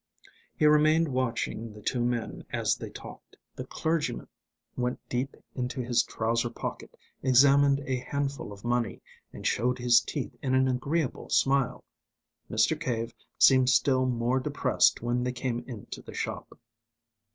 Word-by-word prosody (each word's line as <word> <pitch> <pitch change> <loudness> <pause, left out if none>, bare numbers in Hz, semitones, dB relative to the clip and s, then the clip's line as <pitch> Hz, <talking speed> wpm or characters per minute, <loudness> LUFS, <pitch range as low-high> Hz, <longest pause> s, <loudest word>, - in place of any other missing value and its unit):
He 155 - +1
remained 155 +2 +5
watching 115 -3 -2
the 105 - -12
two 120 +1 0
men 120 -1 -2
as - - 0
they - - -7
talked. - - -12 0.2
The - - -7
clergyman 160 -7 -2 0.5
went 125 0 -1
deep 130 +3 -2 0.2
into 125 +1 -3
his 120 -1 +2
trouser 115 +1 -1
pocket, 115 - -7 0.2
examined 140 +2 +5
a 130 -1 -1
handful 140 -1 -3
of 100 +2 -11
money, 120 -5 -1 0.3
and - - -10
showed 125 +3 +1
his 120 -1 +5
teeth 135 +4 -5
in 130 -2 0
an 130 0 +4
agreeable 135 +3 -1
smile. 135 -1 +2 0.7
Mr. 110 +8 +2
Cave 120 -6 -2 0.2
seemed 130 -1 +6
still 130 0 +3
more 125 +1 +1
depressed 125 - +2
when 120 +1 0
they 125 - -1
came 120 -1 -3
into 115 -6 -8
the - - -11
shop. - - -5
125 Hz, 145 wpm, -28 LUFS, 120-135 Hz, 0.7 s, seemed